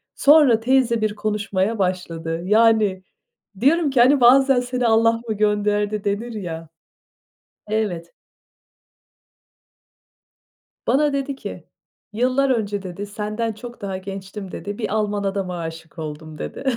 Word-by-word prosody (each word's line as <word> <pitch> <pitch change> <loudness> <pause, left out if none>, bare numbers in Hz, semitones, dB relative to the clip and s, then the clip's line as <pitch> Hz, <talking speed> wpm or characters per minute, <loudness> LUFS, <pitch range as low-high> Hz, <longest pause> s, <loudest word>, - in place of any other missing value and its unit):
Sonra 285 -6 +6
teyze 240 -1 +2
bir 215 -1 0
konuşmaya 210 0 -1
başladı. 170 -3 -2
Yani 215 -2 +3 0.6
diyorum 300 - +3
ki, 265 -3 0
hani, 265 +2 +5
bazen 265 +2 +6
"Seni 245 -1 -1
Allah 230 +1 +3
mı 220 - 0
gönderdi?" 210 0 0
denir 210 +4 -2
ya. 165 -6 -6 1.0
Evet. 205 -6 -2 2.8
Bana 290 +1 +2
dedi 275 0 -2
ki: - - -8 0.5
"yıllar 255 +4 +1
önce" 205 -5 -1
dedi, 190 +2 -6
"Senden 215 +2 -3
çok 240 +2 -11
daha 195 -2 -4
gençtim." 195 0 -8
dedi. 205 0 -6
"Bir 220 - -3
Alman 210 -1 -1
adama 195 -2 -2
aşık 165 0 -8
oldum." 155 0 -7
dedi. - - -6
210 Hz, 120 wpm, -21 LUFS, 195-240 Hz, 2.8 s, Sonra